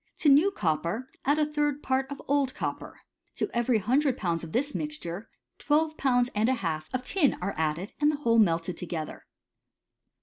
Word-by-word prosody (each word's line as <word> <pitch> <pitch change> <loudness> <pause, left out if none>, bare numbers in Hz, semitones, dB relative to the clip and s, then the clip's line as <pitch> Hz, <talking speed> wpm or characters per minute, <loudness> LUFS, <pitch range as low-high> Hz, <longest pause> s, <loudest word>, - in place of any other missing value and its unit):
To 300 - +3
new 295 +8 +6
copper 170 - -1 0.2
add 285 +2 +3
a 305 - +3
third 295 -1 -1
part 265 0 0
of 280 -1 -6
old 280 -2 +1
copper. - - -5 0.3
To - - -2
every 240 0 +2
hundred 255 +6 +2
pounds 170 -3 -1
of 165 - -7
this 285 - 0
mixture, 225 - -5 0.3
twelve 310 +1 +1
pounds 245 -3 +2
^d 215 +2 +1
a 260 - +3
half 160 -8 -3
of 255 0 -2
tinf 295 0 +2
are 195 +2 -2
added, 160 +5 -2
and 295 - +5
the 305 - +1
whole 230 -5 +3
melted 170 -3 +2
together. 165 -3 -5
250 Hz, 180 wpm, -28 LUFS, 180-290 Hz, 0.3 s, new